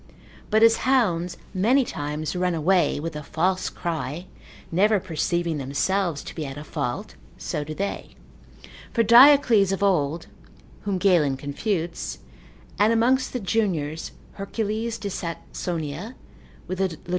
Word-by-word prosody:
But 220 +1 +4
as 225 0 +6
hounds 190 -10 +1 0.2
many 240 +8 +3
times 150 0 -4
run 180 -1 0
away 165 -1 +2
with 165 +1 -5
a 150 - -4
false 185 +5 0
cry, 160 0 -4 0.5
never 205 +5 +3
perceiving 170 -2 -1
themselves 160 +4 -1
to - - -8
be 160 - -4
at 135 -1 -6
a 150 - -7
fault, 150 - -4 0.2
so 150 -4 -3
do 155 +1 -7
they. 200 +3 -4 0.8
For 230 - +3
Diocles 235 -4 +7
of 195 +1 -1
old, 165 -4 +1 0.6
(whom 200 -2 0
Galen 170 -8 +3
confutes,) 165 +5 -3 0.6
and 210 +2 +4
amongst 250 +3 +2
the 250 - -3
juniors, 180 -8 -1 0.2
Hercules 220 +3 -3
de 200 -1 -5
Saxonia, 170 - -5 0.5
with 185 - -5
Lod. 185 -4 -1
180 Hz, 135 wpm, -24 LUFS, 155-210 Hz, 0.8 s, Diocles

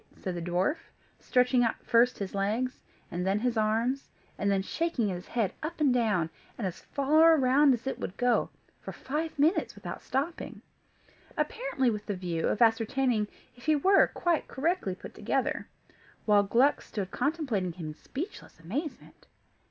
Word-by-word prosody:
said 185 - -4
the 175 - -4
dwarf, 180 - 0 0.4
stretching 250 0 +3
out 230 - +1
first 240 +1 +4
his 195 -2 -5
legs, 215 +6 -1 0.3
and 175 +1 -2
then 195 +2 +1
his 240 +2 0
arms, 225 +5 0 0.3
and 200 - 0
then 195 -1 +2
shaking 280 - -1
his 180 -1 -5
head 225 -6 -1
up 310 +2 -5
and 285 -4 +4
down, 215 -9 +2 0.3
and 230 - -3
as 180 -2 -4
far 310 +3 +4
round 275 +2 +5
as 245 -1 -1
it 270 - -3
would 185 - -5
go, 245 -1 +2 0.3
for - - -7
five 310 +4 -4
minutes 310 +6 +2
without - - -7
stopping; 290 +6 -3 0.7
apparently 270 - 0
with 210 -1 -5
the 205 - -1
view 175 -3 -2
of 215 - +3
ascertaining 225 0 +2 0.3
if 245 +3 -14
he 310 - +5
were 380 +7 +5
quite 345 -3 0
correctly 285 - -1
put - - -11
together, - - -1 0.6
while 210 -1 +5
Gluck 240 +8 +3
stood 195 -3 -5
contemplating 260 - -1
him 165 -3 -6
in - - -6
speechless 310 - -8
amazement. 265 - -6
240 Hz, 165 wpm, -29 LUFS, 200-285 Hz, 0.7 s, round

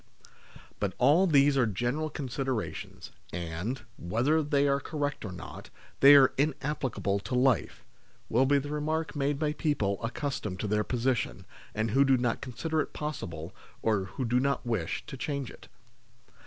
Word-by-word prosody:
" - - -21
BUT 100 -3 -1
all 150 +9 +5
these 145 -3 +5
are 120 - +3
general 120 +9 -1
considerations, 130 -4 -4 0.2
and, 85 +9 -4 0.2
whether 125 - +1
they 145 -1 +2
are 140 0 +2
correct 145 0 -3
or 105 - -5
not, 90 -3 -9 0.3
they 140 +1 +9
are 135 -2 +8
inap 150 0 0
plicable 100 -7 -1
to 125 - -3
life," 125 -2 +1 0.4
will 130 +4 +3
be 145 +1 +4
the 145 +1 -3
remark 155 +1 -2
made 145 0 0
by 150 0 0
people 130 -11 -1
accustomed 115 - -3
to 105 - -2
their 105 +1 +1
position, 125 +1 -1 0.3
and 110 0 0
who 135 +4 +5
do 135 -1 +4
not 120 -1 -1
consider 155 +6 -2
it - - -6
possible, 85 - -5 0.3
or 105 -4 +1
who 125 +7 -4
do 120 +2 +2
not 140 0 0
wish, 110 -9 -2
to - - -7
change 135 +1 -3
it. - - -15
130 Hz, 170 wpm, -29 LUFS, 110-145 Hz, 0.4 s, they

